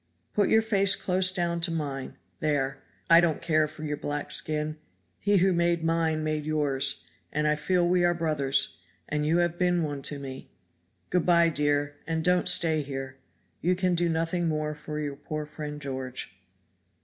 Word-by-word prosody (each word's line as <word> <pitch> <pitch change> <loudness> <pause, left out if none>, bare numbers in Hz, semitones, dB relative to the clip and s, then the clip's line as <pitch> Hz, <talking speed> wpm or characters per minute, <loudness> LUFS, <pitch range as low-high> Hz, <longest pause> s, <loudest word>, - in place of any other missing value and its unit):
Put 205 -2 +2
your 220 0 +4
face 200 -3 +4
close 185 0 +2
down 170 -2 -1
to 170 - +2
mine 145 -5 -4 0.2
there 140 -3 -1 0.3
I 165 +1 +7
don't 165 -4 +1
care 155 -2 +2
for 155 - -10
your 150 -1 -3
black 145 0 -3
skin 155 0 +1 0.4
He 205 0 +3
who 190 +1 +3
made 170 -1 +1
mine 165 -1 +1
made 155 -1 -1
yours; 145 -3 +1 0.3
and 150 0 0
I 150 - +3
feel 175 +2 +1
we 180 0 +2
are 175 0 +3
brothers, 150 -5 0 0.3
and 150 0 -1
you 165 +2 +3
have 175 -1 0
been 180 -2 +2
one 145 -2 -4
to 145 - -5
me. 135 -1 -8 0.6
Good 180 -1 +1
by, 170 -1 +5
dear, 145 -1 0
and 160 -1 -1
don't 180 +1 +3
stay 165 -4 +4
here. 135 -1 -6 0.4
You 180 +2 +2
can 180 0 +1
do 175 0 +1
nothing 165 +1 0
more 155 -1 -1
for 150 0 -6
your 145 -2 -3
poor 155 +2 -5
friend 150 0 -7
George." 130 -7 -6
155 Hz, 180 wpm, -27 LUFS, 145-175 Hz, 0.6 s, I